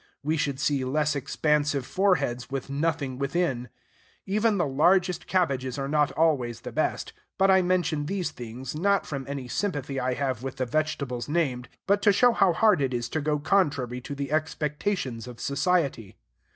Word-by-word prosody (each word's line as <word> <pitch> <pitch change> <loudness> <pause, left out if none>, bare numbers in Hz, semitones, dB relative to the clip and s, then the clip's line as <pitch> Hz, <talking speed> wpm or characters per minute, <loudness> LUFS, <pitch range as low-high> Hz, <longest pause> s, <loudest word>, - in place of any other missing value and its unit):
We 155 +3 +1
should 145 -4 -1
see 140 -2 +1
less 150 +3 0
expansive 145 0 0
foreheads 170 -11 +1
with 135 0 -4
nothing 140 -3 -1
within. 140 -4 -1 0.6
Even 210 +2 +1
the 175 - +2
largest 175 +6 +2
cabbages 135 -9 0
are 135 -1 -2
not 150 0 +2
always 135 -8 +1
the - - -7
best. - - -1 0.2
But 195 0 +4
I 190 0 +6
mention 175 -5 0
these 185 0 -2
things, 125 +1 -7
not 200 +6 +1
from 140 -3 -5
any 140 -2 -5
sympathy 140 -4 -2
I 125 0 -1
have 130 -4 -2
with 135 0 -5
the 130 -1 -1
vegetables 140 -2 -2
named, 130 -7 -1 0.2
but 200 +1 +2
to 205 - +5
show 245 +5 +5
how 195 -5 +4
hard 200 -1 +3
it 130 -2 0
is 120 0 -3
to 155 - -2
go 150 0 0
contrary 145 -7 +1
to 140 +3 -6
the 140 0 -4
expectations 150 - -2
of 125 -1 -10
society. 140 - 0
145 Hz, 175 wpm, -26 LUFS, 130-175 Hz, 0.6 s, I